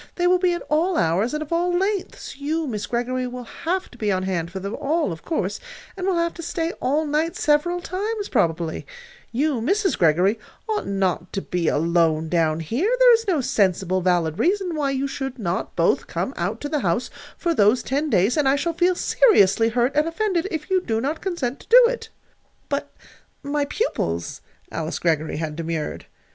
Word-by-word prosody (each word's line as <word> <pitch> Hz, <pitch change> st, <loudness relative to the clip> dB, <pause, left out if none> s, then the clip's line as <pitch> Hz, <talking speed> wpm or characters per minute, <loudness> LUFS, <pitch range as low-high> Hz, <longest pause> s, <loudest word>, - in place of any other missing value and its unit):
They 350 Hz, -, 0 dB
will 360 Hz, 0 st, +4 dB
be 360 Hz, -1 st, +2 dB
at 345 Hz, -, -4 dB
all 330 Hz, +4 st, +1 dB
hours, 190 Hz, -, +1 dB
and 305 Hz, -, -2 dB
of 310 Hz, -, -5 dB
all 350 Hz, +1 st, +1 dB
lengths. 390 Hz, +1 st, -2 dB
You, 310 Hz, +3 st, -2 dB
Miss 210 Hz, -6 st, -4 dB
Greggory, 250 Hz, +1 st, -1 dB
will 250 Hz, 0 st, -6 dB
have 355 Hz, +10 st, -3 dB
to 245 Hz, -, -16 dB
be 210 Hz, -2 st, 0 dB
on 185 Hz, -1 st, 0 dB
hand 175 Hz, -3 st, -2 dB
for 190 Hz, +2 st, -6 dB
them 200 Hz, +3 st, -4 dB
all, 310 Hz, -, 0 dB
of 160 Hz, -1 st, -7 dB
course, 325 Hz, -, -2 dB, 0.4 s
and 375 Hz, -1 st, -3 dB
will 375 Hz, -3 st, +2 dB
have 335 Hz, 0 st, 0 dB
to 335 Hz, -, -8 dB
stay 330 Hz, 0 st, -2 dB
all 295 Hz, +4 st, +1 dB
night 305 Hz, +3 st, 0 dB
several 310 Hz, +4 st, +2 dB
times, 410 Hz, +4 st, -3 dB
probably. 165 Hz, -1 st, -1 dB, 0.4 s
You, 275 Hz, 0 st, 0 dB
Mrs. 390 Hz, -, +1 dB
Greggory, 180 Hz, +6 st, +3 dB, 0.3 s
ought 430 Hz, -1 st, -2 dB
not 190 Hz, -3 st, -1 dB
to 195 Hz, -, -1 dB
be 175 Hz, -2 st, -2 dB
alone 160 Hz, 0 st, +2 dB
down 160 Hz, -2 st, +1 dB
here. 240 Hz, -, 0 dB
There -, -, +7 dB
is 450 Hz, -1 st, +1 dB
no 340 Hz, -7 st, +2 dB
sensible, 185 Hz, -5 st, +1 dB
valid 175 Hz, -3 st, +1 dB
reason 375 Hz, 0 st, +1 dB
why 290 Hz, -2 st, 0 dB
you 275 Hz, 0 st, -1 dB
should 270 Hz, -1 st, -5 dB
not 180 Hz, -5 st, -3 dB
both -, -, +2 dB
come -, -, -3 dB
out -, -, -2 dB
to 290 Hz, -, -4 dB
the 300 Hz, -1 st, 0 dB
house 215 Hz, +3 st, -1 dB, 0.3 s
for 340 Hz, -1 st, 0 dB
those 215 Hz, -2 st, +3 dB
ten 290 Hz, +4 st, -1 dB
days; 200 Hz, -, +2 dB
and 285 Hz, -3 st, +3 dB
I 275 Hz, -, +4 dB
shall 335 Hz, +4 st, -1 dB
feel 355 Hz, +2 st, +2 dB
seriously 225 Hz, -, +4 dB
hurt 245 Hz, +4 st, +1 dB
and 300 Hz, +2 st, +3 dB
offended 365 Hz, 0 st, 0 dB
if 320 Hz, +1 st, -5 dB
you 375 Hz, -1 st, +3 dB
do 225 Hz, -9 st, -1 dB
not 285 Hz, +7 st, -2 dB
consent 295 Hz, -9 st, -2 dB
to -, -, -16 dB
do -, -, +8 dB
it." -, -, -4 dB, 0.6 s
"But -, -, -2 dB, 0.5 s
my 285 Hz, 0 st, 0 dB
pupils," 85 Hz, -, -2 dB, 0.3 s
Alice 160 Hz, -1 st, -3 dB
Greggory 160 Hz, -3 st, 0 dB
had 155 Hz, -1 st, -3 dB
demurred. 165 Hz, -1 st, -4 dB
275 Hz, 200 wpm, -23 LUFS, -, 0.6 s, do